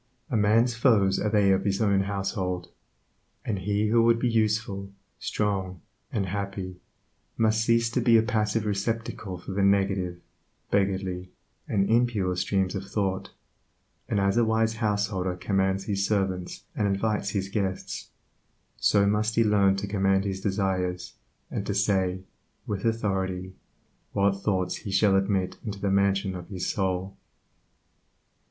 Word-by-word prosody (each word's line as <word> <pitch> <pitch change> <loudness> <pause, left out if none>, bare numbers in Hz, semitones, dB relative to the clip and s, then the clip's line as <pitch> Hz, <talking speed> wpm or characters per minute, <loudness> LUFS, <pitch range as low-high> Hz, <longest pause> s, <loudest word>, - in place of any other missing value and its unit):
"A - - +1
man's 110 +3 +3
foes 110 -6 +3
are 105 - 0
they 105 -2 +4
of 95 - +2
his 100 -1 0
own 100 -3 +3
household," 95 -3 -3 0.7
and 100 -4 -1
he 105 +3 0
who 115 +1 +4
would 115 0 +4
be 125 - 0
useful, 110 -3 0 0.3
strong, 95 -3 -2 0.3
and 100 -3 -1
happy, 95 -1 -4 0.6
must 110 0 +2
cease 115 0 +3
to - - 0
be 115 -2 +5
a 110 - +4
passive 110 -2 0
receptacle 105 -2 -2
for 90 - -8
the 100 +1 -1
negative, 95 -3 +1 0.5
beggardly, 95 -2 0 0.4
and 100 -2 +1
impure 115 -6 +2
streams 95 +1 0
of 95 -1 -4
thought; 100 -2 -2 0.8
and 100 - +1
as 100 +2 +2
a 120 - +5
wise 110 0 +1
householder 100 -4 0
commands 95 +1 0
his 100 -2 -1
servants 95 -3 -1
and 105 - +1
invites 100 +1 0
his 100 -2 -2
guests, 95 -2 -3 0.7
so 100 -1 +3
must 105 +2 +1
he 115 - +4
learn 100 -2 +4
to 95 - -3
command 95 -1 +2
his 95 -1 -3
desires, 95 -3 -1 0.4
and - - -2
to - - -1
say, 95 -1 +1 0.4
with 100 -1 -3
authority, 95 -5 -1 0.6
what 100 0 +3
thoughts 95 -2 -1
he - - -8
shall 95 +1 +3
admit 95 -1 0
into 105 -3 -5
the 100 -1 0
mansion 100 0 +2
of 90 -2 -7
his 95 -3 -4
soul. 95 0 -1
100 Hz, 145 wpm, -27 LUFS, 95-105 Hz, 0.8 s, be